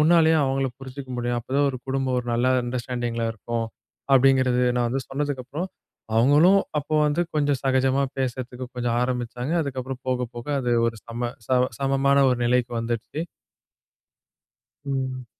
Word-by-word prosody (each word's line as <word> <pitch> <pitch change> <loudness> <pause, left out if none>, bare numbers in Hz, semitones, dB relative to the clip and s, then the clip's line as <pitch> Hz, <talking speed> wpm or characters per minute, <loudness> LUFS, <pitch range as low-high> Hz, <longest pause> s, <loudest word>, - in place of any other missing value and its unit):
உன்னாலேயும் 160 -1 +5
அவங்கள 135 0 0
புரிஞ்சுக்க 130 0 -8
முடியும். 120 0 -1
அப்போ 120 - -20
தான் 145 0 +4
ஒரு 130 - -6
குடும்பம் 135 -1 0
ஒரு 125 - -5
நல்ல 120 +2 +1 0.2
அண்டர்ஸ்டாண்டிங் 120 -1 -3
இருக்கும். 115 +1 -3 0.5
அப்படிங்கிறது 130 -1 +4
நான் 120 -1 +2
வந்து 135 +3 -1
சொன்னதுக்கு 140 -1 -2
அப்புறம், 155 +8 -4 0.5
அவங்களும் 150 +11 +6 0.2
அப்போ 145 +2 -4
வந்து 150 +3 +1 0.2
கொஞ்சம் 145 -3 +1
சகஜமா 130 +1 +2
பேசுறதுக்கு 130 -1 -3
கொஞ்சம் 120 -1 0
ஆரம்பிச்சாங்க. 125 +2 -2
அதுக்கப்புறம் 130 -2 -5
போக 125 -1 0
போக 120 +2 -7
அது 120 -1 0
ஒரு 115 -1 -2
சம 120 +1 -3 0.2
சம 125 0 +3
சமமான 135 0 +2
ஒரு 125 - +1
நிலைக்கு 125 0 +1
வந்துடுச்சு. 115 +5 -3 1.6
ம். 130 -2 -3
130 Hz, 145 wpm, -24 LUFS, 120-135 Hz, 1.6 s, அவங்களும்